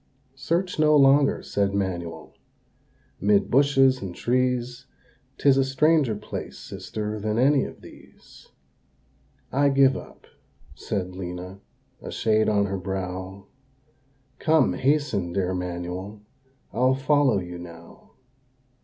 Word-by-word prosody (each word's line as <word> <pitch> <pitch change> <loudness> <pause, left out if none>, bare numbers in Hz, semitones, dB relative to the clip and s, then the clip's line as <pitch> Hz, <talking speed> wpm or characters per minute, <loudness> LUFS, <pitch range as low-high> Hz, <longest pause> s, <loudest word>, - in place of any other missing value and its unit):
"Search 170 +6 -2
no 155 0 +5
longer," 140 0 +4
said 100 -1 -1
Manuel, 90 -4 -4 0.9
"'mid 100 0 +2
bushes 135 -1 +4
and 90 -3 -6
trees, 125 0 -1 0.5
'Tis 140 -1 +4
a 135 - +4
stranger 135 -2 +2
place, 105 +1 -7
sister, 105 0 -6
than 105 +1 -2
any 135 +2 +3
of - - -10
these." - - -17 1.0
"I 140 +2 +3
give 135 -1 +4
up," - - -10 0.5
said 90 -2 -4
Lena, 90 +1 -7 0.4
a - - -8
shade 110 -1 +1
on 100 -1 +2
her 100 -1 -3
brow, 95 +1 -5 0.9
"Come, 160 -1 +3
hasten, 135 - 0
dear 95 -1 -1
Manuel, 90 +3 -5 0.5
I'll 130 +2 +2
follow 135 -3 +2
you 90 -1 -7
now." 85 -1 -13
110 Hz, 115 wpm, -24 LUFS, 95-135 Hz, 1.0 s, no